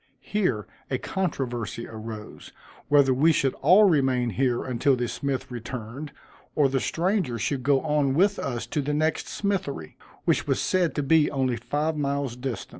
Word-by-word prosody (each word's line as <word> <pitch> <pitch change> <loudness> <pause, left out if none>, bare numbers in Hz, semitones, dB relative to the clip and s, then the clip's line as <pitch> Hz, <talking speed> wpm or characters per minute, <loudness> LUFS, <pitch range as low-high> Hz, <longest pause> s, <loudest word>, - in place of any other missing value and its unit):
Here 155 - 0 0.2
a - - 0
controversy 125 - -3
arose, 110 -1 -9 0.4
whether 140 -2 +5
we 150 +6 +4
should 135 -3 +1
all 195 +4 +7
remain 130 - +3
here 125 +2 0
until 130 +2 +2
the 125 -1 -2
smith 135 +1 -3
returned, 125 +4 -6 0.4
or 145 -2 +4
the 135 0 +1
stranger 175 - 0
should 135 +4 -1
go 135 0 +3
on 150 -3 +1
with 200 +5 +3
us 120 -4 -3
to 150 - -2
the 145 +1 -1
next 155 +1 0
smithery, 185 - -3 0.3
which - - +1
was - - +1
said 180 -3 +1
to 145 - 0
be 155 +1 +4
only 130 -3 0
five 150 +7 -2
miles 140 -3 -1
distant. 125 -3 -5
140 Hz, 165 wpm, -26 LUFS, 125-155 Hz, 0.4 s, all